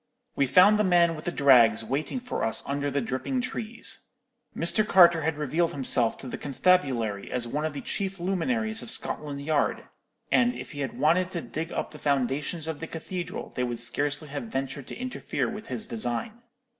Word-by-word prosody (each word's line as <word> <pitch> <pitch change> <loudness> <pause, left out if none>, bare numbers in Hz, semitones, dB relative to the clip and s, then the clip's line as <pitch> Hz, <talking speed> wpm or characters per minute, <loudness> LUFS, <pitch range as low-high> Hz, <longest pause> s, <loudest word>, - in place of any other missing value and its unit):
"We 140 - +2
found 185 +10 +6
the - - +4
man 175 -3 +4
with 155 - -9
the 175 - -1
drags 120 -7 +5
waiting 140 - -2
for 250 0 -4
us 115 - +1
under 140 +1 -1
the 140 0 -1
dripping 130 - -2
trees. 225 -2 -3 0.5
Mr. 170 +6 +3
Carter 175 -5 +6
had 160 0 -1
revealed 155 +3 0
himself 125 -4 +2
to 135 - -9
the - - -6
constabulary 135 - +1
as 120 -2 -1
one 150 +6 -2
of 155 - -2
the 140 - -5
chief 195 -1 -3
luminaries 220 +5 -1
of - - -4
Scotland 145 -8 -2
Yard; 150 -1 0 0.5
and 245 -1 +3
if - - -8
he 145 - -8
had 135 -3 -3
wanted 175 +4 +3
to 175 -2 -4
dig 160 +2 -5
up - - -3
the 150 - -11
foundations 140 +3 -1
of 160 -2 -4
the 165 - -5
cathedral, 175 +2 -6
they 125 - 0
would 120 -1 -2
scarcely 145 +5 -2
have 145 +9 -5
ventured 135 - -4
to - - -7
interfere 255 +1 -3
with 215 -1 -7
his 125 -4 -3
design. 120 - -3
155 Hz, 195 wpm, -27 LUFS, 135-185 Hz, 0.5 s, found